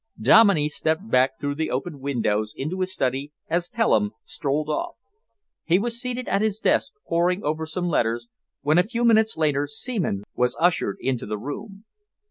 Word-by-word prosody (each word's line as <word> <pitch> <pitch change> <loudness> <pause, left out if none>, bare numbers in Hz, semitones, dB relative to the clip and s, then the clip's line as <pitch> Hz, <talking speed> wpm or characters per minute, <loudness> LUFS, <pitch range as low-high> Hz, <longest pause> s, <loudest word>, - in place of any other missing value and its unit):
Dominey 200 -9 +6
stepped 160 +7 -1
back 130 +1 +3
through 145 -1 -2
the 160 +2 -2
open 140 +3 -3
windows 110 -6 -1
into 160 +7 -3
his 185 0 -1
study 135 -3 -2 0.2
as 170 +1 0
Pelham 110 - +1
strolled 150 0 -2
off. 340 - -2 0.7
He 175 +1 +3
was 235 +3 -2
seated 250 0 -4
at 195 - +1
his 215 -2 +1
desk, - - +1
poring 180 +3 +1
over 155 +2 -2
some 175 +3 -2
letters, 120 -6 0 0.3
when 155 +4 +3
a - - +5
few 235 +3 -2
minutes 220 -3 +4
later 145 -2 +1
Seaman 145 - -2
was 125 0 0
ushered 165 - +2
into 130 -4 -2
the 105 0 -3
room. 195 - -7
160 Hz, 170 wpm, -24 LUFS, 135-200 Hz, 0.7 s, Dominey